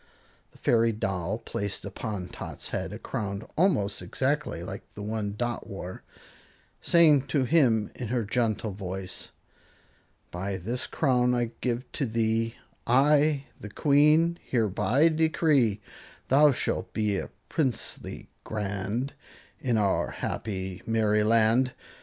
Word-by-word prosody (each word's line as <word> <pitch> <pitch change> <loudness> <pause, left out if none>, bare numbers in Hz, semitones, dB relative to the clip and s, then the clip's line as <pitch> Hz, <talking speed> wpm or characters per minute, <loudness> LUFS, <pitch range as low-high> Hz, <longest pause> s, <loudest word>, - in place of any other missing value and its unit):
The - - -20
fairy 115 -1 +3
doll 95 -1 -2
placed 100 -3 -4
upon 100 -4 -5
Tot's - - -7
head - - -3
a - - -6
crown 100 0 -4
almost 105 - +2
exactly 135 - -1
like 95 +3 -6
the 105 - -6
one 105 -1 -3
Dot 120 0 -2
wore, 95 -2 -7 0.8
saying 150 -5 +5
to 140 -1 +1
him 120 -7 +3
in 120 - -5
her 120 +1 0
gentle 110 -1 0
voice: 95 -1 -4 1.0
By 95 +2 -3
this 115 +7 -3
crown 125 -4 +2
I 120 -1 0
give 125 0 -1
to 135 - -1
thee, 115 0 0 0.3
I, 145 +3 +4 0.2
the 105 - -8
Queen, 150 +7 +4
hereby 120 - +2
decree, 155 -9 +2 0.5
Thou 145 +2 +6
shalt 130 - -2
be 105 -2 0
a - - -6 0.2
princeling 135 -7 -2 0.2
grand 105 +5 -3 0.5
In 120 -4 +1
our 100 -2 +1
happy 95 -3 -4
Merryland. 110 +3 +3
115 Hz, 125 wpm, -27 LUFS, 100-135 Hz, 1.0 s, Thou